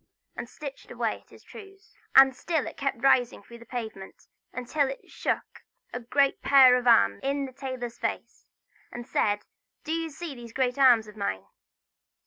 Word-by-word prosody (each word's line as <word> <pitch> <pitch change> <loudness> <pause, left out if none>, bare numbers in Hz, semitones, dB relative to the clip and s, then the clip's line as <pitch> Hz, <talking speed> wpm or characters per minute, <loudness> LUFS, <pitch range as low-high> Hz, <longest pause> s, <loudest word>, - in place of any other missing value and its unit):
and 235 - -7
stitched 280 -3 -9
away - - -3
at - - -32
his - - -17
trews. 390 -3 -14 0.2
And 270 -1 +7
still 320 +2 -2
it - - -7
kept 275 -3 -3
rising 245 -5 +3
through 235 +3 -13
the 235 - -15
pavement, 220 -6 -7 0.3
until 260 +4 -1
it 270 - -9
shook - - -3 0.3
a 245 - -3
great 275 +3 +1
pair 265 -3 +7
of 250 0 -1
arms 100 - +5
in 275 +1 -1
the 260 - -10
tailor's 250 -3 -6
face, - - -5 0.4
and 240 0 -8
said: 205 -4 0 0.4
"Do 315 - -5
you 330 0 -2
see 315 +1 -7
these 235 -3 -11
great 255 0 -1
arms 245 -5 +6
of 210 - -13
mine?" 200 - -3
255 Hz, 175 wpm, -27 LUFS, 235-280 Hz, 0.4 s, And